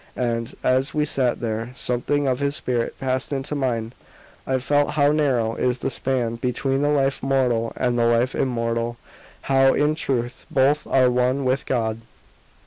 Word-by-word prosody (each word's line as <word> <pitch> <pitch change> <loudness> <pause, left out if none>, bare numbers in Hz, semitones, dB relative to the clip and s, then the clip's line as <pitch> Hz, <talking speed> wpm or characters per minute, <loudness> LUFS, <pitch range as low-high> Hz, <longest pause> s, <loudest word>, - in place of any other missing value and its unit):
And, 115 -2 -2
as 130 +3 +1
we 150 0 +2
sat 130 -4 0
there, 115 +1 -3
something 135 +4 0
of 130 -1 0
his 140 0 0
spirit 120 -4 -2
passed 130 0 -2
into 135 +1 -2
mine; 120 -5 -2 0.5
I 130 - +1
felt 145 +3 +1
how 145 -1 +4
narrow 130 -7 +1
is 125 +1 0
the - - -3
span 120 -2 -1
between 135 +3 -1
the 145 - +2
life 140 -2 +1
mortal 125 -4 +1
and 125 -1 0
the 115 - +3
life 120 +2 +2
immortal 115 -2 -1 0.4
how, 135 0 +3
in 150 +1 +2
truth, 125 -4 -3
both 140 +2 +2
are 130 -2 +3
one 125 +2 +1
with 130 +1 0
God. 115 -3 -1
130 Hz, 165 wpm, -23 LUFS, 120-135 Hz, 0.5 s, how